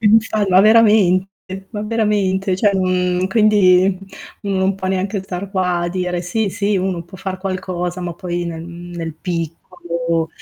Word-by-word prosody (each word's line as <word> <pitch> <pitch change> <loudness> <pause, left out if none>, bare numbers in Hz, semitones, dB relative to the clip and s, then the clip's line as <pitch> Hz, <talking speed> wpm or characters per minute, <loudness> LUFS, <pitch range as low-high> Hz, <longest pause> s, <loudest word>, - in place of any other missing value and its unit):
Infa 220 -1 +3
ma 185 +1 +6
veramente, 195 -3 +3
ma 210 - -5
veramente, 205 -4 0
cioè 205 +1 +3 0.6
quindi 195 -3 +4 0.4
non 195 -1 0
può 190 -1 -4
neanche 190 +1 -1
star 190 +1 -6
qua 180 -3 0
a 175 0 -1
dire: 180 -1 -2
"Sì, 205 +3 -1
sì 205 +1 0
uno 185 -2 -1
può 180 +3 -13
far 190 0 -5
qualcosa" 185 -2 -3
ma 175 -1 -4
poi, 175 0 -3
mhmm, - - -3
nel 160 - -7 0.3
nel 165 -2 -5
piccolo, 170 0 -3
185 Hz, 150 wpm, -19 LUFS, 180-200 Hz, 0.6 s, ma